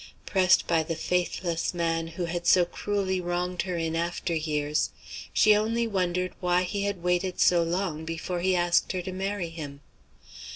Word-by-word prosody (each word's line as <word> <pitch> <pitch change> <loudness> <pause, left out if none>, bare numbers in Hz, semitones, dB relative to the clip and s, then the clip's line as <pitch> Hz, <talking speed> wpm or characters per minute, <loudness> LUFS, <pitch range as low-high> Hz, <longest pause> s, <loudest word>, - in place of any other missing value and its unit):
Pressed 185 -2 +4
by 165 -2 +2
the 165 +1 -3
faithless 175 0 -1
man 165 -1 0
who 170 +2 -4
had 175 0 -3
so 180 0 +6
cruelly 190 +1 -2
wronged 175 0 -1
her 180 -2 -3
in 165 -1 -1
after 170 +1 -2
years, 150 -2 0 0.4
she 215 -1 +5
only 225 +3 +1
wondered 185 -3 -1
why 180 0 +2
he 200 +2 -2
had 200 -4 -3
waited 180 +1 0
so 175 -1 +5
long 170 -2 -1
before 165 +2 -3
he 185 +1 +2
asked 175 +1 +2
her 180 -1 -2
to 185 - -5
marry 195 -2 -2
him. 145 -4 -8
175 Hz, 170 wpm, -27 LUFS, 165-185 Hz, 0.4 s, so